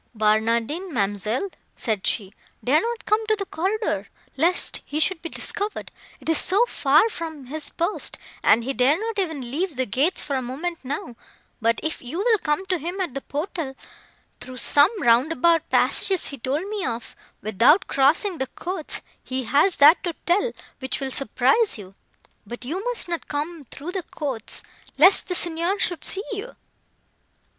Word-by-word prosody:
"Barnardine, 230 - +1
ma'amselle," 210 - -1 0.3
said 215 -5 -2
she, 200 -3 -1 0.3
"dare 290 +6 +3
not 470 0 -4
come 425 +1 +2
to 435 - +3
the 400 -2 -4
corridor, 370 - -2 0.3
lest 335 +6 +1
he 295 - -3
should 325 +1 +2
be 335 - -5
discovered, 415 +5 -4 0.3
it - - -11
is 325 -1 +3
so 400 +6 +3
far 305 - +3
from 320 - -7
his 305 +4 -4
post; 345 +4 -2 0.2
and 235 - +4
he 270 +3 -2
dare 265 +6 +3
not 445 -1 -3
even 320 -7 -2
leave 335 +3 -1
the 260 0 0
gates 285 - 0
for 280 - -3
a 260 - 0
moment 305 +8 -4
now; 255 -3 -5 0.5
but, 230 +1 +2
if 315 +1 -2
you 260 +7 -6
will 440 +3 +3
come 310 +3 -1
to 370 -2 -1
him 350 +6 -5
at 360 -9 -2
the 275 - -4
portal, 295 -2 -4 0.6
through 255 +1 -9
some 285 +5 +5
roundabout 305 +7 +3
passages 380 -3 +2
he 280 - -7
told 280 +10 -2
me 415 -2 -3
of, 235 -1 -4 0.3
without 245 - +4
crossing 320 +7 +2
the 265 - -1
courts, 345 +4 -5 0.2
he 260 0 -3
has 295 +9 +3
that 300 +5 +6
to 345 -2 -2
tell, 405 +7 +2 0.3
which 260 +1 -2
will 270 -1 -4
surprise 275 - +1
you. 195 -2 -11 0.5
But 240 +3 -8
you 350 +9 -3
must - - +2
not 340 -1 -4
come 300 +1 -4
through 310 +6 -6
the 380 0 -3
courts, 270 -9 -5 0.3
lest 365 +7 +8
the 360 - -1
Signor 345 +3 0
should 350 -3 +2
see 390 - +4
you." 430 +4 -6
310 Hz, 170 wpm, -23 LUFS, 260-370 Hz, 0.6 s, lest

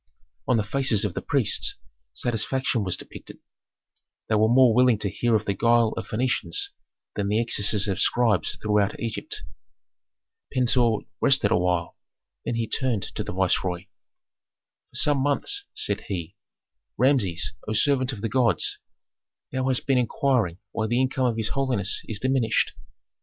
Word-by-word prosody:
On 125 - +3
the 110 - +1
faces 110 -2 +2
of 100 - -2
the - - -4
priests - - +2 0.4
satisfaction 120 - -1
was 90 -2 -1
depicted; - - -11 0.9
they - - +1
were 110 +1 +3
more 125 -1 +5
willing 125 -1 +4
to 100 -2 -2
hear 120 +5 +1
of 110 0 0
the 100 - 0
guile 115 +1 +3
of - - -5
Phœnicians 130 - -1 0.5
than 100 -1 -1
the 105 +2 +1
excesses 105 -3 +1
of 95 -2 -2
scribes 105 -4 +2
throughout 105 -2 0
Egypt. 115 -2 -4 1.1
Pentuer 120 -3 +2 0.2
rested - - +3
awhile, 90 -1 0 0.5
then 120 - -2
he 115 -1 -1
turned 120 -7 -1
to - - -3
the - - -6
viceroy. 90 -1 0 1.1
"For - - -19
some 145 -1 +4
months," 270 - -1
said 100 - -1
he, 90 -1 -5 0.6
"Rameses, 125 -11 +1
O 110 - -2
servant 130 +2 +2
of 110 -6 -8
the 115 - -1
gods, 115 +1 +1 0.7
thou 130 0 -1
hast 130 -2 0
been 135 -2 +3
inquiring 120 -7 0
why 110 -1 -2
the 120 +2 +1
income 130 0 +1
of 115 -2 -1
his 110 -1 -2
holiness 125 -8 0
is 110 - -3
diminished. 130 0 +1
115 Hz, 150 wpm, -25 LUFS, 100-130 Hz, 1.1 s, more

